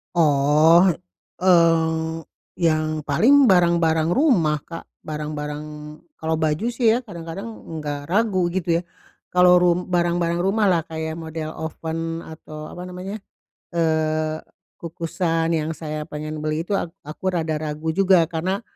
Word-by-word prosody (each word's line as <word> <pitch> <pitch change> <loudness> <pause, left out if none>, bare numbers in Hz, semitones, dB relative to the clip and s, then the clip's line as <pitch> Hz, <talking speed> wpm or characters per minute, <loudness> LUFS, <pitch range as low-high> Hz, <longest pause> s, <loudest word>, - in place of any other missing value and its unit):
Oh, 155 +3 +5 0.6
eee, 165 -2 +3 0.4
yang 155 -2 0
paling 235 - +5
barang-barang 170 -3 +3
rumah 170 - +2
Kak, 165 -1 -9 0.2
barang-barang 150 -1 -5 0.5
kalau 160 0 -2
baju 155 +7 0
sih 235 -1 0
ya 250 - -3
kadang-kadang 170 -3 -7 0.2
enggak 145 -3 -5
ragu 190 -2 +1
gitu 170 -1 0
ya, - - -6 0.5
kalau 180 0 +5
rum 180 +1 +1
barang-barang 170 -1 +1
rumahlah 190 -3 +2
kayak 160 0 -4
model 160 -1 -5
oven 165 +1 -4
atau 155 -1 -10
apa 180 - -8
namanya, 185 +4 -6 0.6
eee, 155 -1 0 0.4
kukusan 165 0 -2
yang 160 -1 -1
saya 155 -1 -5
pengen 155 +1 -6
beli 155 +1 -2
itu 195 +3 -1
a - - -2 0.2
aku 150 +5 -8
rada 160 -2 -1
ragu 155 +1 -3
juga 185 +1 +4
karena, 185 +6 -2
165 Hz, 130 wpm, -22 LUFS, 155-180 Hz, 0.6 s, Oh